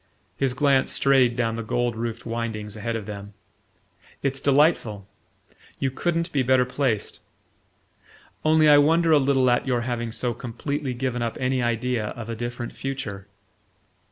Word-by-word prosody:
His 135 -2 0
glance 135 -2 +3
strayed 130 -3 +3
down 115 -2 -1
the - - -3
gold 120 +1 -1
roofed 115 0 -4
windings 115 -3 -4
ahead 115 +2 -3
of 110 -3 -4
them. 100 -1 -8 0.9
"It's 135 -1 0
delightful: 135 - +2 0.7
you 135 - -1
couldn't 170 +4 -1
be 140 - +1
better 130 0 +3
placed. 125 -4 -2 1.2
Only 155 0 +4
I 145 -1 +8
wonder 165 +3 +3
a 150 - +6
little 135 -1 +2
at 120 - +1
your 125 -2 +1
having 120 -1 -3
so 120 +2 -2
completely 125 +3 -4
given 125 -1 -2
up 115 -1 -2
any 130 0 0
idea 120 -1 0
of 115 -1 -7
a 115 - -3
different 120 +1 -5
future." 115 -8 -5
125 Hz, 155 wpm, -24 LUFS, 115-135 Hz, 1.2 s, I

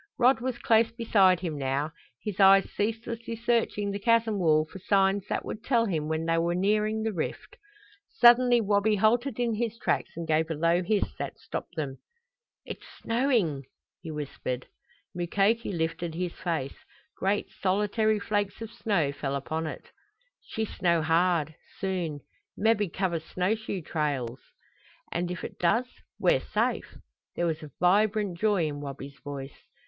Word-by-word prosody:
Rod 250 -1 +4
was 255 -1 -2
close 225 0 +3
beside 200 -6 +3
him 160 -5 -3
now, 140 +3 -1 0.3
his 210 -3 -4
eyes 195 0 +7
ceaselessly 230 +2 -3
searching 230 -3 0
the 200 - -3
chasm 225 -1 +2
wall 155 -3 +4
for 190 - -11
signs 195 +1 +2
that - - -2
would 220 - -6
tell 235 -2 +2
him 160 -7 -1
when 160 +1 -1
they 165 0 +2
were 170 +1 +1
nearing 215 +3 +1
the 220 -1 -1
rift. 165 - -4 0.5
Suddenly 240 0 +6
Wabi 205 +1 +2
halted 235 +4 +2
in 235 -2 +1
his 230 0 -2
tracks - - 0
and 170 -1 -4
gave 160 +1 +2
a 160 - -1
low 170 +3 +2
hiss 205 +3 0
that - - -4
stopped - - -6
them. 140 -5 -4 0.7
"It's - - -8 0.2
snowing!" 230 - +1 0.4
he 170 - -8
whispered. 140 -4 -4 0.5
Mukoki 200 +6 +1
lifted 165 -1 -2
his 180 0 -2
face. 160 -6 -3 0.4
Great 200 +2 -1
solitary 210 +3 +2
flakes 205 0 -1
of 225 -1 -7
snow 200 -11 0
fell 140 -1 -3
upon 160 +4 -3
it. - - -8 0.5
"She 220 - -3
snow 170 -5 +1
hard 165 -1 +2 0.2
soon. 175 -7 -2 0.4
Mebby 210 -2 +2
cover 175 -1 -1
snow 180 +5 -1
shoe 215 -5 -4
trails!" 140 -6 -2 0.7
"And 175 +1 -1
if 180 -1 -5
it - - -7
does 205 +9 +3 0.3
we're - - +3
safe!" - - -1 0.4
There 175 - 0
was 160 -2 -1
a 155 - -9
vibrant 200 0 +2
joy 205 -6 +2
in 145 -1 -4
Wabi's 140 0 -8
voice. 140 -2 -8
190 Hz, 155 wpm, -28 LUFS, 160-220 Hz, 0.7 s, eyes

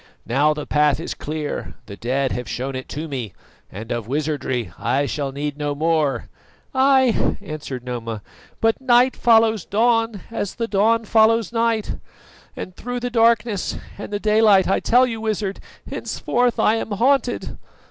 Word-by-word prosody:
Now 145 +6 +2
the 150 - -5
path 150 -1 +2
is 165 - -4
clear, 150 -1 -5
the 100 - -9
dead 130 +4 -1
have 125 -4 -4
shown 130 +5 -3
it 130 - -6
to 155 +3 -5
me, 125 - -5 0.4
and 110 +4 -8
of 120 -3 -3
wizardry 135 - -2
I 120 +7 +1
shall 140 -1 -3
need 145 +1 -4
no 145 -1 -1
more." 155 -5 0 0.5
"Ay!" 265 -2 +3
answered 155 -9 -6
Noma, 115 -4 -5 0.4
"but 225 +3 +1
night 250 0 +4
follows 225 -4 +4
dawn 225 -1 +1
as 205 -4 -3
the 230 - -2
dawn 225 +2 +2
follows 220 -1 +3
night; 230 -2 0 0.6
and 185 - -7
through 245 0 -4
the 245 0 -3
darkness 230 -3 +2 0.2
and 205 - -8
the 205 - -2
daylight, 210 -2 +4
I 195 - +2
tell 250 +2 +4
you, 225 -3 -4
Wizard, 210 -3 -2 0.3
henceforth 245 0 -1
I 220 - +3
am 225 - -4
haunted! 250 +3 +1
195 Hz, 155 wpm, -21 LUFS, 140-230 Hz, 0.6 s, night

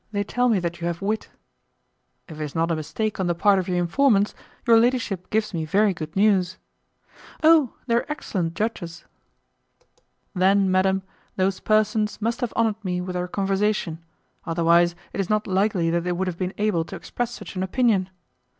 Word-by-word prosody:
They 205 -1 -1
tell 245 +4 +1
me 220 - +3
that 175 -1 -3
you 170 - -1
have 170 +2 -4
wit." 215 +2 -2 1.0
"If 155 -1 -9
it - - -1
is 150 - -6
not 165 +1 +1
a - - +1
mistake 210 +8 -3
on 185 - 0
the 175 - 0
part 195 +3 +4
of 185 - -3
your 180 -1 0
informants, 205 +4 +2 0.3
your 230 -2 +6
ladyship 230 -6 0
gives 215 -1 0
me 165 -2 -2
very 200 +6 +2
good 155 -2 -7
news." 190 -3 +2 0.9
"Oh! 315 -5 +5
they 235 - 0
are 235 - +2
excellent 180 - -3
judges." 190 -6 -4 1.3
"Then, 190 +1 +3
madam, 190 +1 +2 0.3
those 190 0 0
persons 215 0 +1
must 230 +3 -2
have 245 - -1
honoured 220 -2 0
me 180 -2 -2
with 180 0 -4
their 180 0 -2
conversation; 195 -3 -1 0.4
otherwise, 170 +1 +3 0.2
it - - -5
is 195 - -1
not 215 0 +1
likely 190 -3 +1
that 170 0 0
they 180 0 -1
would 185 +2 -1
have 180 -2 -4
been 185 0 -3
able 205 -6 +1
to 195 - -8
express 230 +7 -4
such 240 - -9
an 185 - -2
opinion." 195 -1 +1
190 Hz, 185 wpm, -24 LUFS, 175-215 Hz, 1.3 s, your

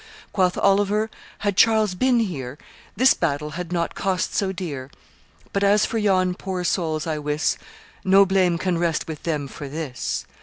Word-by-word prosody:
Quoth 185 -3 +2
Oliver, 205 +2 +2 0.3
'Had 205 -2 -1
Charles 220 -2 +4
been 245 +4 +2
here, 140 - -4 0.4
This 260 +5 +5
battle 150 -2 -2
had 175 +2 -6
not 170 -1 -1
cost 190 -2 -1
so 195 -2 0
dear; 150 -8 -5 0.6
But 200 - +1
as 205 +1 +4
for 225 - -2
yon 185 -3 +2
poor 185 0 -4
souls, 160 -3 -1
I 155 -2 -2
wis, 150 +1 0 0.5
No 195 +1 +6
blame 185 -3 +2
can 180 -1 -1
rest 170 -2 0
with 155 -2 -6
them 150 -4 -2
for 140 +1 -8
this. 145 -3 -4
180 Hz, 165 wpm, -23 LUFS, 155-200 Hz, 0.6 s, No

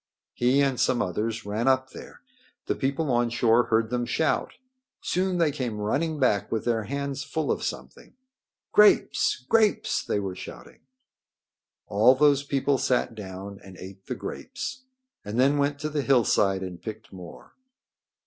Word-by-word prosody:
He 125 +3 +2
and 135 -3 0
some 120 - +2
others 110 +4 -2
ran 105 +4 -2
up 130 0 +2
there. - - -12 0.4
The - - 0
people 140 +2 -1
on 120 0 +2
shore 120 0 +3
heard 110 0 +1
them 120 -1 -1
shout. 155 +6 0 0.5
Soon 185 0 0
they 165 -3 +2
came 125 -6 -4
running 145 +10 -1
back 115 -7 +1
with 110 - -2
their 115 -3 0
hands 140 +3 -3
full 150 +2 -2
of - - -1
something. - - -7 0.6
"Grapes! 210 -10 +4
Grapes!" 220 -2 +2
they - - -1
were 95 -2 -4
shouting. - - -11 1.1
All 110 +6 +4
those 145 0 +4
people 140 -1 0
sat 125 -2 0
down 100 -1 -8
and 95 -2 -13
ate 95 +1 -11
the 125 - -3
grapes 255 - -6 0.4
and 105 +4 -4
then 140 +3 +3
went 140 0 +1
to 155 - -2
the 150 -1 -1
hillside 105 -8 +2
and 90 -2 -7
picked 110 -3 -8
more. 90 -2 -12
125 Hz, 160 wpm, -26 LUFS, 105-140 Hz, 1.1 s, Grapes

